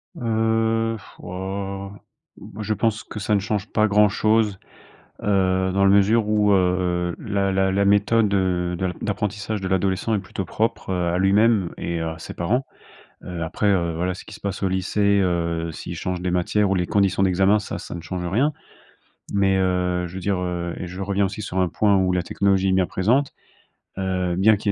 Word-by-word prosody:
Heu, 115 Hz, 0 st, +1 dB
pff, 100 Hz, -, -16 dB
oh, 95 Hz, +1 st, -5 dB, 0.5 s
moi, 105 Hz, +2 st, -9 dB
je 110 Hz, +1 st, 0 dB
pense 110 Hz, -1 st, 0 dB
que 105 Hz, -, -8 dB
ça 105 Hz, +1 st, +1 dB
ne -, -, +3 dB
change 100 Hz, +1 st, -2 dB
pas 110 Hz, 0 st, +3 dB
grand-chose, 105 Hz, 0 st, +3 dB, 0.6 s
heu, 95 Hz, -2 st, +1 dB
dans 100 Hz, 0 st, +2 dB
la -, -, +5 dB
mesure 105 Hz, +3 st, +4 dB
où, 105 Hz, -1 st, +3 dB
heu, 90 Hz, -2 st, +1 dB
la 100 Hz, -2 st, -1 dB
la 95 Hz, 0 st, +2 dB
la 100 Hz, +1 st, +2 dB
méthode, 105 Hz, +1 st, +3 dB
heu, 90 Hz, -2 st, 0 dB
d'ap 90 Hz, 0 st, -3 dB
d'apprentissage 105 Hz, 0 st, -2 dB
de 95 Hz, -, -3 dB
l'adolescent 95 Hz, +3 st, 0 dB
est -, -, 0 dB
plutôt 95 Hz, 0 st, -5 dB
propre, 110 Hz, +4 st, -2 dB
heu, 90 Hz, -2 st, 0 dB
à -, -, +1 dB
lui-même 100 Hz, 0 st, +3 dB
et 85 Hz, -1 st, -3 dB
à 80 Hz, 0 st, -4 dB
ses 80 Hz, -, -8 dB
parents. 120 Hz, +10 st, -1 dB, 0.6 s
Heu, 90 Hz, -2 st, -5 dB
après, 90 Hz, +6 st, -1 dB
heu, 85 Hz, -4 st, +1 dB
voilà, 90 Hz, +2 st, -1 dB
ce -, -, -11 dB
qui -, -, -10 dB
se -, -, -12 dB
passe 100 Hz, -1 st, -4 dB
au 95 Hz, -, +2 dB
lycée, 100 Hz, +2 st, +1 dB
heu, 85 Hz, -2 st, -1 dB
s'ils -, -, -7 dB
changent 90 Hz, -1 st, -3 dB
des 90 Hz, -, -2 dB
matières 90 Hz, +4 st, +1 dB
ou -, -, +2 dB
les 90 Hz, -1 st, 0 dB
conditions 100 Hz, -1 st, +2 dB
d'examen, 95 Hz, +3 st, +3 dB
ça 105 Hz, -, -5 dB
ça -, -, -8 dB
ne 85 Hz, -, -6 dB
change 90 Hz, +1 st, -4 dB
rien. 125 Hz, -, +1 dB, 0.8 s
Mais 95 Hz, -1 st, +3 dB
heu, 90 Hz, -1 st, 0 dB
je 85 Hz, -, -10 dB
veux 95 Hz, -, -5 dB
dire 100 Hz, 0 st, 0 dB
heu, 85 Hz, -1 st, -3 dB
et 90 Hz, -, -5 dB
je 90 Hz, +2 st, -6 dB
reviens 100 Hz, 0 st, +1 dB
aussi 100 Hz, +3 st, -6 dB
sur 95 Hz, -2 st, -4 dB
un 90 Hz, -, +2 dB
point 100 Hz, +3 st, +2 dB
où 95 Hz, -1 st, +2 dB
la 90 Hz, -1 st, +1 dB
technologie 95 Hz, +1 st, +1 dB
est -, -, +2 dB
bien 95 Hz, -1 st, +3 dB
présente.e 125 Hz, +9 st, +1 dB, 0.7 s
Heu, 90 Hz, -2 st, -1 dB
bien 105 Hz, +2 st, +5 dB
qu'il 105 Hz, -, -2 dB
y -, -, +4 dB
95 Hz, 205 wpm, -23 LUFS, 90-105 Hz, 0.8 s, la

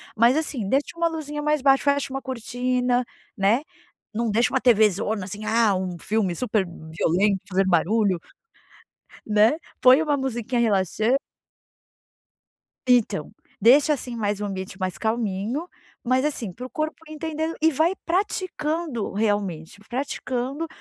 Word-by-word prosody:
mas, 235 Hz, +4 st, +5 dB
assim, 280 Hz, -9 st, -1 dB
deixa 280 Hz, +8 st, 0 dB
uma 335 Hz, 0 st, +2 dB
luzinha 300 Hz, -2 st, -4 dB
mais 300 Hz, -1 st, +1 dB
baixa, 270 Hz, 0 st, +4 dB
fecha 280 Hz, -2 st, +1 dB
uma 270 Hz, -, -3 dB
cortina, 250 Hz, 0 st, -1 dB, 0.3 s
né, 205 Hz, +6 st, +3 dB, 0.5 s
não 230 Hz, +1 st, -1 dB
deixa 230 Hz, +3 st, +3 dB
uma 265 Hz, -, +3 dB
tvzona, 215 Hz, -3 st, +3 dB
assim, 205 Hz, +3 st, -7 dB
ah, 220 Hz, -2 st, +3 dB
um 185 Hz, -1 st, -3 dB
filme 205 Hz, -4 st, 0 dB
super 215 Hz, -2 st, 0 dB
violento 175 Hz, +4 st, 0 dB
fazer 190 Hz, 0 st, +2 dB
barulho, 190 Hz, +2 st, +2 dB, 1.1 s
né, 215 Hz, +4 st, +4 dB, 0.3 s
põe 260 Hz, +4 st, +7 dB
uma 295 Hz, -2 st, +1 dB
musiquinha 240 Hz, -2 st, -1 dB
relaxa 215 Hz, +3 st, +2 dB, 1.7 s
Então, 220 Hz, -10 st, +2 dB, 0.3 s
deixa, 275 Hz, +8 st, +6 dB
assim, 250 Hz, -3 st, -3 dB
mais 205 Hz, -2 st, -1 dB
um 210 Hz, -, -2 dB
ambiente 190 Hz, -1 st, -5 dB
mais 185 Hz, -1 st, -2 dB
calminho, 225 Hz, -, -2 dB, 0.4 s
mas, 255 Hz, +1 st, +2 dB
assim, 240 Hz, -10 st, -2 dB
para 250 Hz, +7 st, -7 dB
o -, -, -22 dB
corpo 310 Hz, +2 st, -3 dB
entender 315 Hz, +1 st, -3 dB
e 320 Hz, +1 st, +4 dB
vai 320 Hz, +6 st, +2 dB
praticando 335 Hz, -, -2 dB
realmente, 200 Hz, -5 st, -2 dB
praticando 260 Hz, +3 st, -3 dB
235 Hz, 135 wpm, -24 LUFS, 205-280 Hz, 1.7 s, põe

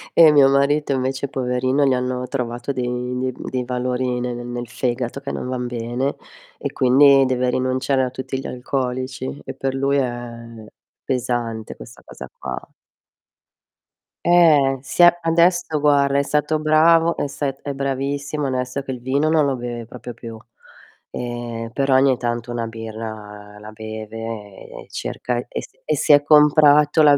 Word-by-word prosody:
Eh 160 Hz, -2 st, +8 dB
mio 140 Hz, -2 st, +6 dB
marito 140 Hz, +2 st, +2 dB
invece 130 Hz, +1 st, -2 dB
poverino 130 Hz, +2 st, 0 dB
gli 135 Hz, -, +3 dB
hanno 125 Hz, 0 st, -2 dB
trovato 125 Hz, 0 st, -3 dB
dei 125 Hz, -1 st, -3 dB
dei 130 Hz, 0 st, -1 dB
dei 125 Hz, -1 st, -4 dB
valori 125 Hz, 0 st, -1 dB
ne 125 Hz, 0 st, -3 dB
nel 120 Hz, 0 st, -6 dB
fegato 125 Hz, +1 st, -3 dB
che 140 Hz, 0 st, -6 dB
non -, -, -4 dB
van 125 Hz, -1 st, -3 dB
bene 120 Hz, +3 st, -2 dB, 0.4 s
e -, -, -4 dB
quindi 135 Hz, +1 st, +5 dB
deve 125 Hz, -1 st, 0 dB
rinunciare 130 Hz, +1 st, 0 dB
a 125 Hz, -, -1 dB
tutti 130 Hz, +1 st, -5 dB
gli -, -, -8 dB
alcolici 130 Hz, +1 st, -4 dB
e -, -, -6 dB
per 135 Hz, 0 st, -2 dB
lui 140 Hz, +1 st, +1 dB
è 115 Hz, -3 st, -5 dB, 0.4 s
pesante 120 Hz, -3 st, -3 dB
questa -, -, -13 dB
cosa -, -, -10 dB
qua. -, -, -6 dB, 1.6 s
Eh, 150 Hz, -6 st, +5 dB
sì 140 Hz, +6 st, +1 dB
a 175 Hz, 0 st, +7 dB
adesso 170 Hz, -1 st, +2 dB
guarda 140 Hz, -1 st, +3 dB
è 140 Hz, -, +3 dB
stato 150 Hz, +2 st, 0 dB
bravo, 165 Hz, +2 st, +4 dB
è -, -, -2 dB
st 140 Hz, -1 st, -4 dB
è 145 Hz, -, -4 dB
bravissimo, 140 Hz, +2 st, -2 dB
onesto 130 Hz, +1 st, -2 dB
che 135 Hz, -, -6 dB
il 125 Hz, -, -5 dB
vino 140 Hz, +5 st, 0 dB
non 155 Hz, -2 st, +3 dB
lo 135 Hz, -2 st, 0 dB
beve 120 Hz, -1 st, -6 dB
proprio 120 Hz, +1 st, -9 dB
più, 115 Hz, -1 st, -9 dB, 0.7 s
ehm, 120 Hz, -1 st, -5 dB
però 135 Hz, +1 st, +1 dB
ogni 130 Hz, -1 st, +4 dB
tanto 120 Hz, 0 st, -3 dB
una 120 Hz, -1 st, -3 dB
birra 110 Hz, -2 st, -8 dB
la 105 Hz, +1 st, -10 dB
beve 110 Hz, 0 st, -8 dB, 0.5 s
e -, -, -11 dB
cerca 125 Hz, -1 st, -4 dB
e -, -, -5 dB
si -, -, -15 dB
e 155 Hz, -, +1 dB
si 150 Hz, -, +2 dB
è 145 Hz, -, +7 dB
comprato 150 Hz, 0 st, +5 dB
la 145 Hz, -2 st, +6 dB
130 Hz, 160 wpm, -21 LUFS, 120-140 Hz, 1.6 s, Eh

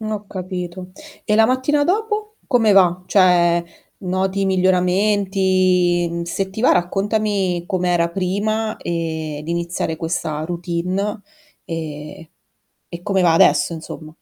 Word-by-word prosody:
N 215 Hz, 0 st, -4 dB
ho 210 Hz, -1 st, -4 dB
capito. 185 Hz, -1 st, -6 dB, 0.3 s
E 210 Hz, -, +1 dB
la 220 Hz, 0 st, +5 dB
mattina 260 Hz, +4 st, +1 dB
dopo 425 Hz, +3 st, -1 dB
come 230 Hz, -5 st, +3 dB
va? 185 Hz, -2 st, +4 dB
Cioè, 175 Hz, -3 st, +4 dB, 0.4 s
noti 190 Hz, +1 st, -1 dB
miglioramenti? 185 Hz, -2 st, +2 dB
Se 190 Hz, +3 st, -3 dB
ti 210 Hz, +3 st, -6 dB
va 250 Hz, -, +5 dB
raccontami 195 Hz, -1 st, 0 dB
com'era 175 Hz, -2 st, 0 dB
prima, 210 Hz, +4 st, -1 dB
ehm, 160 Hz, -3 st, -4 dB
di 165 Hz, -, -5 dB
iniziare 170 Hz, -1 st, -2 dB
questa 155 Hz, -2 st, -3 dB
routine, 180 Hz, +4 st, -3 dB, 0.4 s
e 155 Hz, -1 st, -7 dB, 0.7 s
e 170 Hz, -, -6 dB
come 195 Hz, -2 st, +1 dB
va 170 Hz, -2 st, +4 dB
adesso 165 Hz, -, +4 dB
insomma. 160 Hz, -1 st, -8 dB
185 Hz, 120 wpm, -20 LUFS, 170-205 Hz, 0.7 s, la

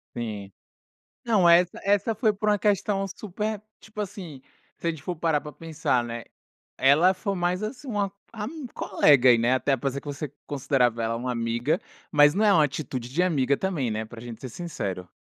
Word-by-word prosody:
Sim. 105 Hz, -4 st, -5 dB, 0.7 s
Não, 200 Hz, -7 st, +4 dB
essa 175 Hz, +1 st, +4 dB
essa 205 Hz, +3 st, +2 dB
foi 220 Hz, 0 st, +2 dB
por 210 Hz, +1 st, -1 dB
uma 205 Hz, -1 st, +2 dB
questão 200 Hz, -1 st, +1 dB
super, 210 Hz, +2 st, -4 dB, 0.2 s
tipo 215 Hz, -1 st, -12 dB
assim, 180 Hz, -9 st, -6 dB, 0.4 s
se 170 Hz, -, -4 dB
a -, -, +3 dB
gente 155 Hz, -3 st, -10 dB
for 180 Hz, +1 st, -4 dB
parar 155 Hz, -3 st, +1 dB
para 150 Hz, 0 st, -8 dB
pensar, 155 Hz, -7 st, -1 dB
né? 115 Hz, 0 st, -6 dB, 0.6 s
Ela 150 Hz, +8 st, +5 dB
foi 195 Hz, +2 st, -3 dB
mais 180 Hz, +2 st, -1 dB
assim 255 Hz, +5 st, -6 dB
uma 205 Hz, -3 st, -1 dB, 0.2 s
ami 255 Hz, +7 st, -6 dB
colega 130 Hz, -4 st, +4 dB
aí, 120 Hz, -, +6 dB
né, 120 Hz, +2 st, +2 dB
até 135 Hz, +1 st, +1 dB
parecia 135 Hz, +2 st, -3 dB
que -, -, -20 dB
você 145 Hz, +1 st, -5 dB, 0.2 s
considerava 125 Hz, -4 st, +1 dB
ela 115 Hz, +1 st, -1 dB
uma 125 Hz, +1 st, -3 dB
amiga, 115 Hz, +4 st, 0 dB, 0.3 s
mas 145 Hz, 0 st, +6 dB
não 215 Hz, +2 st, +2 dB
é 205 Hz, -, +6 dB
uma 155 Hz, -4 st, +5 dB
atitude 130 Hz, -4 st, -4 dB
de 170 Hz, +7 st, +1 dB
amiga 140 Hz, -6 st, +2 dB
também, 160 Hz, -11 st, -1 dB
né? 110 Hz, +1 st, -2 dB
Para 115 Hz, 0 st, -11 dB
gente 120 Hz, -2 st, -9 dB
ser 130 Hz, -, -6 dB
sincero. 100 Hz, -, -5 dB
155 Hz, 195 wpm, -26 LUFS, 125-195 Hz, 0.7 s, aí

